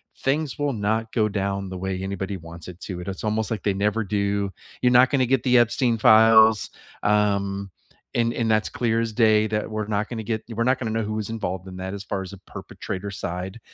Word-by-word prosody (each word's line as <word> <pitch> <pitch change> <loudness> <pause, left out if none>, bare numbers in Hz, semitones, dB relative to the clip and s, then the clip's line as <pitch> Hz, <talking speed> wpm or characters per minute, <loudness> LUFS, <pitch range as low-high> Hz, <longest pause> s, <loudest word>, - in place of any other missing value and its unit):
things 145 +1 -1
will 145 -1 +1
not 110 +1 -1
go 110 -3 +2
down 100 -1 -2
the 95 - -6
way 95 0 -3
anybody 95 0 -3
wants 85 0 -11
it 90 0 -10
to, 90 -3 -6
it 90 - -9
is 95 +2 -5
almost, 110 0 -1
like, 105 - -3
they 100 - +1
never 105 +3 0
do. 100 -1 -1 0.3
"You're 125 - +5
not 125 +1 +6
gona 130 -3 +2
get 130 0 +2
the 125 -1 +4
Epstein 120 0 +2
files." 110 0 +6 0.3
Um, 100 -2 +1 0.4
and 115 -1 +2
and 115 -2 0
that's 110 0 +2
clear 115 -2 0
as 115 -1 -1
day 110 -1 +4
that 105 0 -2
we're 110 -1 -3
not 105 0 -1
gonna 115 -2 -5
get 110 0 -3
you 115 - -8
we're 115 - +1
not 130 +2 +2
gonna 115 -4 -3
know 115 +1 0
who 110 0 -3
was 110 +1 -3
involved 95 -4 -4
in 90 - -8
that 95 +2 -5
as 100 - -7
far 100 -1 -3
as 95 - -7
a 100 - -9
perpetrator 95 +1 -7
side. 95 +2 -5
105 Hz, 230 wpm, -24 LUFS, 100-115 Hz, 0.4 s, not